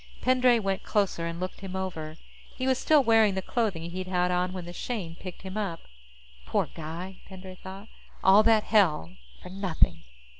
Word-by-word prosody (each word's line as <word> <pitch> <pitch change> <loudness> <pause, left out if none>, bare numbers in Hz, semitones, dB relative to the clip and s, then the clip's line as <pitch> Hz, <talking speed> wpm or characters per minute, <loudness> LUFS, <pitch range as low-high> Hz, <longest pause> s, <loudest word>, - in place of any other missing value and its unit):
Pendray 250 -1 +4
went 195 -3 -1
closer 195 -5 0
and 170 0 -5
looked 185 0 -5
him 190 -1 -7
over. 165 -5 -4 0.4
He 255 - -3
was 260 -1 +2
still 305 -3 +4
wearing 225 -4 +4
the 190 - -1
clothing 185 -9 -1
he'd 185 +1 -5
had 180 -1 +1
on 180 0 0
when 185 -2 -6
the 175 - -8
Shane 190 -6 -4
picked 180 +1 -10
him 190 +2 -6
up. 190 -6 -3 0.7
Poor - - 0
guy, 170 +4 -7
Pendray 190 -1 -10
thought. 195 +3 -9 0.4
_All 195 +3 +7
that 220 -2 +5
hell 165 - +2 0.3
for - - -9
nothing. 190 -3 +1
190 Hz, 180 wpm, -28 LUFS, 180-215 Hz, 0.7 s, All